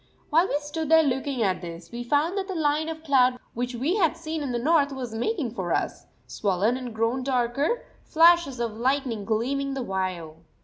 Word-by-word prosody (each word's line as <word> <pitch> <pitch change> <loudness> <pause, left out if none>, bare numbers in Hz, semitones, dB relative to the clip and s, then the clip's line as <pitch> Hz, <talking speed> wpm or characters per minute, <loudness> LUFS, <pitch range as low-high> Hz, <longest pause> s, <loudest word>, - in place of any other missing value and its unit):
While 330 +5 +4
we 290 - 0
stood 300 +1 -4
there 320 0 +7
looking 265 -2 -1
at 190 -3 0
this, 170 -1 -9
we 240 +1 -5
found 295 +8 +1
that 390 -1 -2
the 380 - -4
line 310 0 +1
of 320 -1 -6
cloud 255 -4 +3 0.2
which 245 +1 -3
we 295 - 0
had 335 -5 +2
seen 320 -1 -4
in 280 -3 -3
the 240 - -1
North 285 +2 +3
was 255 -4 -5
making 245 - -2
for 185 -7 -2
us, - - -3 0.2
swollen 205 +4 0
and 255 -2 -5
grown 230 +4 0
darker, 265 - 0 0.2
flashes 330 -5 +4
of 230 -2 -2
lightning 250 -3 -1
gleaming 270 +6 -1
the 265 - -2
while. 185 -6 -3
265 Hz, 195 wpm, -26 LUFS, 230-310 Hz, 0.2 s, there